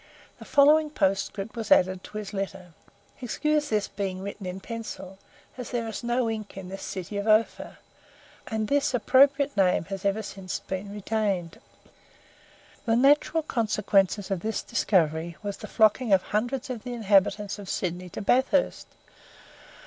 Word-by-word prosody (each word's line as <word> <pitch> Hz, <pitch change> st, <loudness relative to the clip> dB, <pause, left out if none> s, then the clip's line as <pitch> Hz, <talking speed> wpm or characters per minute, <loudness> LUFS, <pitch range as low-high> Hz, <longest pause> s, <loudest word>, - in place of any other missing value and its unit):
The -, -, -11 dB
following 300 Hz, +2 st, +5 dB
postscript 195 Hz, -3 st, -1 dB
was 225 Hz, -2 st, -5 dB
added 185 Hz, 0 st, +4 dB
to 215 Hz, -, -8 dB
his 210 Hz, -1 st, -6 dB
letter: 190 Hz, -3 st, -5 dB, 0.5 s
"Excuse 300 Hz, +5 st, 0 dB
this 210 Hz, -2 st, 0 dB
being 190 Hz, -2 st, -4 dB
written 200 Hz, -1 st, -6 dB
in 180 Hz, +1 st, -5 dB
pencil, 195 Hz, -3 st, -7 dB, 0.4 s
as 250 Hz, -, -5 dB
there 235 Hz, -2 st, -2 dB
is 220 Hz, +2 st, -6 dB
no 240 Hz, 0 st, +1 dB
ink 215 Hz, -3 st, -5 dB
in 185 Hz, -1 st, -7 dB
this 195 Hz, +1 st, -7 dB
city 190 Hz, +2 st, -5 dB
of 200 Hz, +2 st, -3 dB
Ophir." 215 Hz, +1 st, +2 dB, 0.7 s
And 220 Hz, -1 st, -2 dB
this 280 Hz, -1 st, +1 dB
appropriate 275 Hz, +4 st, +4 dB
name 185 Hz, -4 st, +2 dB
has 195 Hz, -1 st, -5 dB
ever 200 Hz, +2 st, 0 dB
since 190 Hz, -2 st, -5 dB
been 190 Hz, +1 st, -6 dB
retained. 205 Hz, -4 st, -2 dB, 1.3 s
The 225 Hz, -, +3 dB
natural 290 Hz, +5 st, +4 dB
consequences 210 Hz, -, +1 dB
of 190 Hz, -, 0 dB
this 220 Hz, +4 st, -3 dB
discovery 170 Hz, -7 st, +1 dB
was 200 Hz, -1 st, -4 dB
the -, -, -8 dB
flocking 220 Hz, +1 st, +3 dB
of 190 Hz, -, +4 dB
hundreds 245 Hz, +5 st, -2 dB
of 235 Hz, -3 st, -5 dB
the 245 Hz, -, -5 dB
inhabitants 205 Hz, -2 st, +2 dB
of 195 Hz, -2 st, -9 dB
Sydney 180 Hz, 0 st, -3 dB
to 205 Hz, -, -6 dB
Bathurst. 260 Hz, +5 st, +2 dB
210 Hz, 155 wpm, -26 LUFS, 195-240 Hz, 1.3 s, following